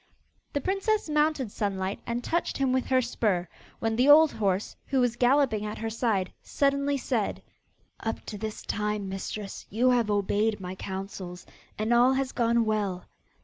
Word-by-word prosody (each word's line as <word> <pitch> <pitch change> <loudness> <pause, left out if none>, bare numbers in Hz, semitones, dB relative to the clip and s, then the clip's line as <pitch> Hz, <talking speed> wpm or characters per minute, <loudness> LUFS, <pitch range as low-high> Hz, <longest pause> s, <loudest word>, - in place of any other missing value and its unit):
The 285 - 0
princess 395 - 0
mounted 300 -6 +1
Sunlight, 195 -2 -2
and 235 +1 -2
touched 340 +6 -1
him 270 -2 +1
with 260 -1 0
her 260 -1 +3
spur, 205 -7 0 0.3
when 225 -1 -1
the 255 +4 +4
old 310 +1 +8
horse, 200 -2 -1
who 270 - +1
was 245 -2 +2
galloping 245 -3 +3
at 210 0 -4
her 225 0 -3
side, 220 -5 0
suddenly 280 0 +1
said: - - -2 0.6
'Up 225 - -3
to 210 - -6
this 215 0 -5
time, 210 -1 -2
mistress, 195 +1 -5
you 245 +5 +3
have 240 -3 +2
obeyed 205 +1 +1
my 180 -1 -5
counsels 190 -1 -6 0.3
and 220 +3 +1
all 245 +2 +5
has 265 0 -1
gone 235 -1 +2
well. 205 -4 -1
225 Hz, 165 wpm, -28 LUFS, 205-260 Hz, 0.6 s, old